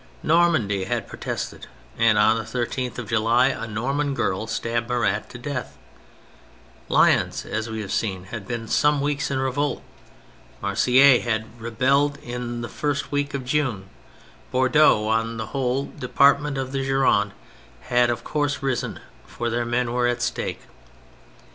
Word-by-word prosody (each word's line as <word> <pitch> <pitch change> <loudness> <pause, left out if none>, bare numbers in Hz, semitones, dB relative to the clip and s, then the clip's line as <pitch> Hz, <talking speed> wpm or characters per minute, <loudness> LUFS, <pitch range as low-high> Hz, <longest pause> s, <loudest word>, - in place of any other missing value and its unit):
Nor 170 +2 +4
mandy 100 - 0
had - - -2
protested, - - -5 0.3
and 115 -2 +3
on 105 +2 +5
the 110 - -3
13th 125 +2 -3
of 120 -3 -5
July 115 +3 +3
a 125 -4 -4
Norman 135 +6 -1
girl 110 -3 -1
stabbed 115 +1 -2
Marat 110 -4 0
to 120 - -9
death, 130 +1 -5 1.1
Lyons, - - +3
as 110 +1 -3
we 110 0 -4
have 100 -2 -6
seen, 95 -5 -1
had 100 0 -8
been 115 -1 -4
some 150 +5 +3
weeks 145 0 -1
in 135 - -1
revolt; 135 +1 -1 0.8
Marseilles 130 - +5
had 110 -2 -1 0.2
rebelled 135 +5 +1
in 120 -1 -5
the 120 - -4
first 145 +2 -2
week 145 0 -1
of 135 -2 -4
June, 125 -8 -1 0.6
Bordeaux 130 -4 +4
and 115 +1 0
the 110 - -3
whole 135 0 0
department 140 +2 +3
of 130 -1 -3
the 135 -1 -2
Gironde 135 -7 +2 0.5
had 120 -1 +2
of 120 -1 -2
course 145 -2 -1
risen, 135 -3 -2 0.3
for 120 - -3
their 120 +1 -1
men 120 0 -1
were 125 0 +2
at 120 0 -1
stake. - - -3
125 Hz, 155 wpm, -23 LUFS, 115-140 Hz, 1.1 s, on